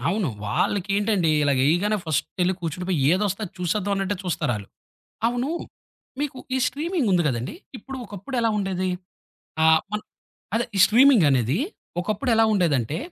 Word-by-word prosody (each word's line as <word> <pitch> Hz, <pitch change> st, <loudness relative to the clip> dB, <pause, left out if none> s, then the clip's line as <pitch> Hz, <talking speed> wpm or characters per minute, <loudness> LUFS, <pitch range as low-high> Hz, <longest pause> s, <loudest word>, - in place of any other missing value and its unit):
అవును. 195 Hz, -6 st, 0 dB, 0.2 s
వాళ్ళకేంటండి 200 Hz, -, +1 dB
ఇలా 145 Hz, -, +3 dB
యేయగానే 175 Hz, +9 st, +2 dB
ఫస్టెళ్లి 180 Hz, +4 st, 0 dB
కూర్చుడి 170 Hz, +2 st, -4 dB
పోయి, 180 Hz, -5 st, +1 dB
ఏదస్తే 200 Hz, +2 st, 0 dB
అది 185 Hz, -, -9 dB
చూసేద్దాం 200 Hz, +3 st, -1 dB
అన్నట్టే 195 Hz, 0 st, -1 dB
చూస్తారాళ్ళు. 120 Hz, -, -2 dB, 0.6 s
అవును, 245 Hz, +4 st, -1 dB, 0.7 s
మీకు 285 Hz, -3 st, -3 dB, 0.2 s
ఈ -, -, +1 dB
స్ట్రీమింగుంది 280 Hz, -, 0 dB
గదండీ! 120 Hz, -1 st, -3 dB, 0.2 s
ఇప్పుడు 270 Hz, +5 st, -8 dB
ఒకప్పుడెలా 225 Hz, +4 st, -2 dB
ఉండేది? 185 Hz, -2 st, -1 dB, 0.7 s
ఆహ్, 160 Hz, 0 st, +6 dB
మన్ 210 Hz, -, -2 dB, 0.5 s
అదే 235 Hz, -, +2 dB
ఈ -, -, +1 dB
స్ట్రీమింగనేది 170 Hz, -, +4 dB, 0.4 s
ఒకప్పుడు 215 Hz, +7 st, -1 dB
ఎలా 225 Hz, -, +5 dB
ఉండేదంటే, 155 Hz, -, +1 dB
195 Hz, 130 wpm, -24 LUFS, 165-215 Hz, 0.7 s, ఆహ్